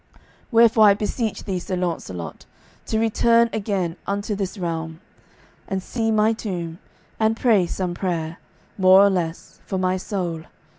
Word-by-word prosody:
Wherefore 225 -2 +6
I 200 - +7
beseech 215 +1 -3
thee, 190 -4 -2
Sir 185 +1 -4
Launcelot, 165 - -4 0.4
to 220 - 0
return 230 +1 +3
again 195 -5 -2
unto 200 +1 -2
this 195 0 -3
realm, 165 -2 -4 0.7
and 190 -1 -3
see 225 +1 -2
my 215 0 +3
tomb, 175 -6 -5 0.4
and 220 0 +2
pray 215 -8 +3
some 180 0 -3
prayer, 170 -3 -3 0.4
more 185 0 +7
or 200 0 +5
less, 175 -3 -4
for 190 - -2
my 185 0 +1
soul. 175 -5 -4
190 Hz, 145 wpm, -22 LUFS, 175-220 Hz, 0.7 s, I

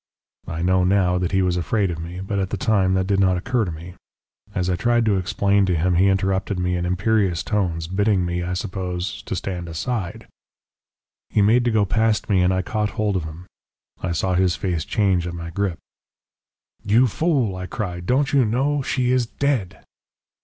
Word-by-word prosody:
"I 80 +1 -4
know 95 0 +3
now 90 -1 +2
that 90 -1 -1
he 95 -1 +2
was 90 -1 +1
afraid 95 +2 0
of 80 - -5
me, 85 +3 -6
but 100 +1 -2
at 95 -1 -1
the - - -3
time 100 -6 +2
that 95 0 +1
did 100 0 +1
not 95 -2 +3
occur 115 +5 0
to 90 - -4
me. 85 +3 -9 0.6
As 90 - 0
I 90 - +1
tried 120 +5 +2
to 105 -3 +2
explain 100 +2 +1
to 90 - +1
him 90 +3 +1
he 90 +3 +4
interrupted 95 0 0
me 90 0 0
in 90 0 -1
imperious 90 -1 +1
tones, 90 -6 -1
bidding 95 +1 +1
me, 85 0 -2
I 90 +1 -3
suppose, 90 0 -4
stand 90 -2 -3
aside. 95 +3 -4 1.0
"He 105 - +2
made 115 +4 +4
to - - +3
go 110 -2 +3
past 110 +2 +1
me, 95 -2 +4
And 90 +1 +3
I 95 0 0
caught 105 0 -1
hold 105 -2 0
of 90 -4 -1
him. 80 +3 -9 0.6
"I 90 - -2
saw 90 +2 0
his 90 -1 +2
face 85 -5 -2
change 95 -4 +1
at 85 - -5
my 85 -1 -6
grip. 95 -1 -1 1.1
"'You 110 +5 +4
fool,' 130 - 0
I 90 0 -5
cried. 90 -4 -5
'Don't 135 +3 +1
you 140 -2 +5
know? 135 +6 +1
She 125 -1 0
is 125 -2 +2
dead!' 115 - -2
95 Hz, 200 wpm, -22 LUFS, 90-105 Hz, 1.1 s, you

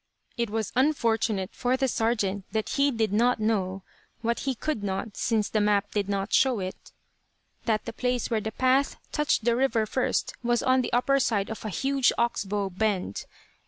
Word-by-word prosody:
It 235 -2 -1
was 220 0 -2
unfortunate 225 -7 +1
for 250 +1 0
the 265 0 +1
sergeant 210 -5 0
that 220 -1 -1
he 280 0 +2
did 225 -5 0
not 240 +3 +3
know 195 -3 -1 0.4
what 235 +1 0
he 265 - 0
could 300 -2 -2
not, 195 +2 -3
since 220 -3 0
the 215 - 0
map 205 -1 +2
did 205 -1 -1
not 195 +1 -2
show 260 -4 +4
it 185 0 -7 0.7
that 220 -2 0
the 230 - -5
place 250 0 -1
where 220 -2 +1
the 220 - -4
path 260 +4 +2 0.2
touched 300 -6 +1
the 235 -1 +3
river 235 -3 +2
first 255 +4 -1
was 240 -1 +1
on 260 0 +4
the - - -3
upper 275 +3 +3
side 215 -5 0
of 220 - -6
a - - -2
huge 270 +5 +2
"ox 235 -3 0
bow" 200 0 -2
bend. 190 - -1
225 Hz, 190 wpm, -27 LUFS, 205-250 Hz, 0.7 s, show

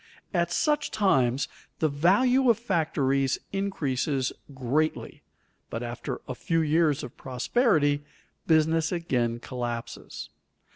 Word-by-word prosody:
At 175 -2 +1
such 295 -1 +1
times 135 - +2 0.3
the 160 - +2
value 210 - +3
of 230 - +5
factories 150 - +1 0.2
increases 140 -8 -1 0.2
greatly, 140 +4 -1 0.5
but 115 - -4
after 120 0 -5
a 130 - -3
few 165 +5 0
years 155 -1 +2
of 125 - -8
prosperity 145 - +1 0.4
business 160 0 +3
again 125 -9 0
collapses. 120 -2 -6
155 Hz, 105 wpm, -27 LUFS, 130-175 Hz, 0.5 s, of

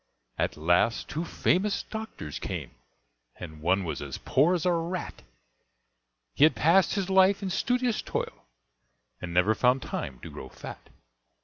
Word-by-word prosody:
At - - 0
last 85 +8 +2
two 160 +3 -2
famous 190 +4 +1
doctors 220 - -7
came, - - -5 0.6
And 80 -3 -9
one 95 +4 +2
was 85 - -4
as 70 -2 -5
poor 155 +7 +3
as 170 - -2
a 180 - +4
rat, 170 +1 -3 1.1
He - - +3
had 155 - +6
passed 175 +5 +4
his 195 -3 -1
life 190 +1 +4
in 190 - -2
studious 245 +4 0
toil, - - -4 0.8
And 90 - -5
never 90 +5 +3
found 125 +3 +2
time 65 -2 -5
to - - -9
grow - - -9
fat. - - -10
165 Hz, 150 wpm, -28 LUFS, -, 1.1 s, had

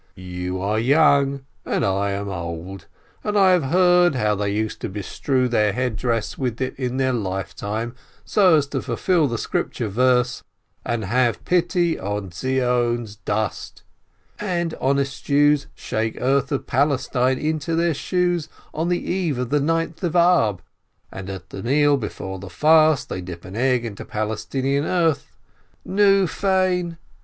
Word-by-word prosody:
You 90 0 -5
are 105 +3 0
young, 140 +1 +3 0.2
and - - -1
I 100 +1 0
am 100 +1 -3
old, 85 +1 -6 0.4
and 210 0 0
I 190 -2 +6
have 180 -5 +3
heard 175 +1 +4
how 105 -4 +1
they 100 0 -1
used 110 +1 -2
to - - -3
bestrew 125 +6 -1
their 105 -4 +2
head 125 -1 -1
dress 115 -1 -2
with 125 -4 -2
it 130 -1 -2
in 125 -1 -2
their 130 -1 +1
lifetime, 105 +2 -3 0.3
so 185 -5 +4
as 145 - +1
to 135 -3 -2
fulfil 155 +8 +1
the 120 -2 -2
Scripture 110 - -2
verse, 125 +3 +2 0.4
'And 115 -3 -2
have 120 +2 +1
pity 175 -1 +1
on 100 -1 -4
Zion's 120 0 0
dust,' 105 0 -3 0.6
and 175 -5 -1
honest 140 0 0
Jews 145 0 +3
shake 110 0 -3
earth 135 +2 +1
of 140 - -2
Palestine 130 -1 +1
into 155 +2 -1
their 170 0 +2
shoes 175 +1 -1 0.2
on 165 +3 -1
the 175 - +2
eve 175 -7 -1
of 125 -1 -3
the 150 - +3
Ninth 165 +3 -1
of 170 -2 -1
Ab, 170 - +3 0.5
and 95 0 -7
at 95 -2 -8
the 95 - -6
meal 145 +5 +3
before 95 -6 -5
the 95 0 -9
fast 155 - +4
they 90 - -4
dip 90 -1 -9
an 95 - -9
egg 125 0 +1
into 105 -3 -6
Palestinian 130 +6 -2
earth 165 -5 0 0.3
— - - -38
nu, 195 0 +4
fein! 185 -2 0
130 Hz, 160 wpm, -22 LUFS, 105-160 Hz, 0.6 s, I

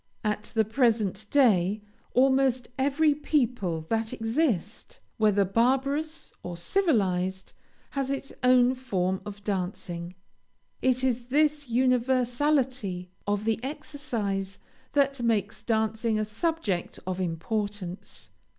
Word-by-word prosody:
At 210 0 -1
the 220 -1 +4
present 220 -4 +1
day, 210 -7 +3 0.3
almost 265 -1 +3
every 285 +3 +3
people 245 - 0
that 225 0 0
exist, 225 - -1 0.2
whether 205 -2 +3
barbarous 270 - 0
or 175 -1 -6
civilized, 190 - 0 0.4
has 275 -1 -2
its 275 0 -3
own 250 0 +5
form 190 -8 -1
of 205 0 -8
dancing. 185 -3 -3 0.7
It 255 0 +2
is 245 -2 0
this 295 0 +2
universality 250 -5 +1 0.2
of 205 +1 0
the 225 +1 0
exercise 235 -10 -3 0.4
that 275 -2 +2
makes 225 -2 0
dancing 220 0 0
a 215 - 0
subject 215 - -2
of 185 0 -2
importance. 185 +2 -4
225 Hz, 105 wpm, -27 LUFS, 195-265 Hz, 0.7 s, own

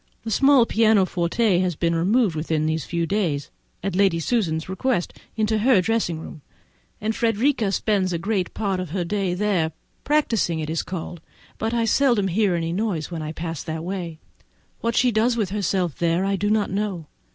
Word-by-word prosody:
The 225 - -4
small 270 +2 +5
pianoforte 205 -3 +2
has 180 -2 0
been 170 +2 0
removed 190 +3 +2
within 155 0 -1
these 160 -1 -1
few 170 -1 -1
days, 165 -7 -1 0.3
at 195 -1 -2
Lady 190 -3 +3
Susan's 165 -6 0
request, 190 +1 -1 0.2
into 220 -1 +1
her 235 -1 +4
dressing 185 -4 0
room, 155 -1 -10 0.6
and 220 +1 -2
Frederica 230 -1 +1
spends 195 -2 +1
great 190 +1 -1
part 195 -3 -1
of 180 -4 -5
the 185 -3 -1
day 195 -1 -1
there, 180 -5 0 0.3
practising 230 - +1
as - - -2
it 155 - -5
is 165 - 0
called; 175 -2 -6 0.4
but 220 +1 -1
I 230 -1 +1
seldom 235 -5 +2
hear 195 0 +2
any 165 0 -2
noise 185 -5 -2
when 165 -2 -4
I 155 0 -4
pass 165 -1 -5
that 160 0 -5
way; 175 -3 -4 0.6
what 230 0 -1
she 250 -1 +3
does 230 +2 +2
with 205 -5 -1
herself 190 -5 -1
there 170 +2 +1
I 195 0 +1
do 205 +2 -1
not 210 -2 +1
know. 195 -4 -2
190 Hz, 185 wpm, -23 LUFS, 170-220 Hz, 0.6 s, small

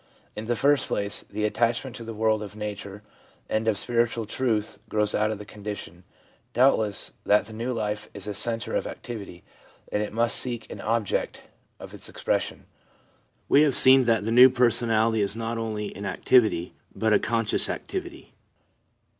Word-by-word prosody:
In 105 - -5
the 120 +1 0
first 140 +3 +2
place, 100 0 -3
the 105 +1 -2
attachment 120 +3 0
to 115 - -8
the 115 -1 -7
world 110 0 +1
of 105 -1 -8
nature 105 -1 -6 0.4
and 110 +1 -1
of 110 -3 +2
spiritual 115 0 0
truth 110 -1 -2
grows 105 -1 0
out 105 0 +1
of 110 - -3
the 105 - -9
condition, 100 -5 -8 0.5
doubtless, 110 -6 +2
that 105 +1 +3
the 110 - -11
new 115 +3 -3
life 105 -3 -3
is 100 -1 -7
a 105 - -4
centre 115 +3 -2
of - - -1
activity, 100 -7 -8 0.5
and 105 - 0
it 105 - -3
must 115 +1 +1
seek 120 -3 -3
an - - -7
object 110 -2 -1 0.4
of - - -10
its - - -7
expression. - - -2 0.8
We 140 - +5
have 145 -4 +3
seen 130 0 +8
that 115 -3 +2
the 115 - -1
new 125 +3 +9
personality 115 -3 +2
is 100 +1 -1
not 115 0 -3
only 110 -2 -4
an 100 0 -5
activity, 110 -9 +2 0.2
but 110 -1 +1
a - - +5
con 115 0 0
scious - - +2
activity. 355 -3 -6
110 Hz, 175 wpm, -26 LUFS, 105-120 Hz, 0.8 s, new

